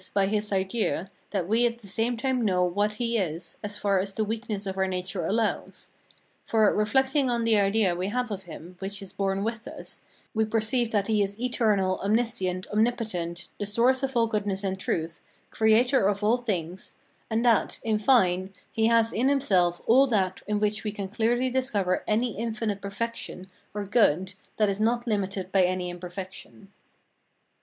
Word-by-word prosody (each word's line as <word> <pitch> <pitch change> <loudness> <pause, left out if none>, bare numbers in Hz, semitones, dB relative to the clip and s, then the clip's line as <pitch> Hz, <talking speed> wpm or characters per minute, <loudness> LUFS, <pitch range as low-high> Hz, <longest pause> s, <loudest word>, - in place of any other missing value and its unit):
by 200 -1 +4
his 210 +1 0
idea, 190 -1 -1 0.2
that 190 -4 -2
we 225 +4 +3
at 235 0 -4
the 225 -4 -12
same 225 +5 0
time 260 0 0
know 185 -4 +2
what 205 +4 +1
he 230 +1 0
is, 165 -2 -3
as 205 0 -4
far 200 -2 +1
as 195 +1 -2
the 220 - +1
weakness 215 -1 -3
of 190 -1 -3
our 190 0 +1
nature 185 0 -3
allows; 220 +1 -1 0.5
for, 220 -2 +3
reflecting 265 +5 +2
on 235 -1 0
the 230 -1 +4
idea 200 -1 +3
we 180 +2 -2
have 245 +2 -2
of 195 -2 -5
him 175 +2 -10
which 195 +1 -3
is 190 0 -10
born 195 0 -1
with 225 +1 -4
us, - - -8 0.3
we 220 - +2
perceive 225 +2 +1
that 205 -3 +1
he 215 -1 +2
is 200 +1 -2
eternal, 210 -6 +1
omniscient, 200 -4 0
omnipotent, 210 -6 -1
the 205 - -1
source 245 +5 +3
of 270 -2 -1
all 230 - +4
goodness 205 -3 -2
and 190 -1 -2
truth, 165 -2 -3 0.3
creator 225 +1 +3
of 205 0 -1
all 225 +4 +4
things, 185 -7 -4 0.3
and 225 +2 0
that, 235 -2 +3
in 215 -1 +1
fine, 190 -6 +3 0.2
he 225 0 +2
has 230 0 +3
in 255 +4 +2
himself 185 -11 +2
all 265 +4 +5
that 190 -6 0
in 210 0 0
which 210 0 0
we 210 - -2
can 200 -2 -5
clearly 230 +5 +1
discover 235 -8 0
any 225 +1 +1
infinite 220 -3 -2
perfection 205 -2 -5 0.3
or 205 0 -4
good 190 -4 +2 0.2
that 215 - +3
is 200 0 -1
not 235 +2 +1
limited 195 -4 -2
by 195 - +4
any 180 0 0
imperfection. 185 +2 -9
210 Hz, 180 wpm, -27 LUFS, 190-230 Hz, 0.5 s, all